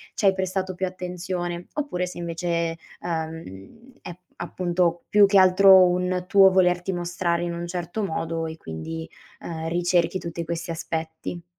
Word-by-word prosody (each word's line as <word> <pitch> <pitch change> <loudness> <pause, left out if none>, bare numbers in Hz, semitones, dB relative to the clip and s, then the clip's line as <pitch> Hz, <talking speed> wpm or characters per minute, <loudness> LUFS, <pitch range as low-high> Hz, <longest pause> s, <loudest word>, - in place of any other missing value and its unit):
ci - - -1
hai 195 - +6
prestato 190 0 -2
più 190 - -1
attenzione. 180 -1 -4
Oppure 280 -12 -2
se 180 - -8
invece 170 0 -4 0.3
è - - -14 0.2
uhm, 160 - -6
è 175 - -7 0.2
appunto, 175 -1 -1
più 205 -1 +7
che 195 0 +5
altro 190 0 +7
un 180 0 -1
tuo 195 0 +6
volerti 180 0 +2
mostrare 175 -1 -1
in 175 0 -2
un 170 0 -4
certo 175 +4 -4
modo 165 -2 -2
e 160 - -6
quindi, 160 - -7 0.3
ehm, 165 -1 -5
ricerchi 175 +1 +1
tutti 170 -1 -5
questi 165 +1 -4
aspetti. 160 +1 -5
175 Hz, 155 wpm, -24 LUFS, 165-185 Hz, 0.3 s, più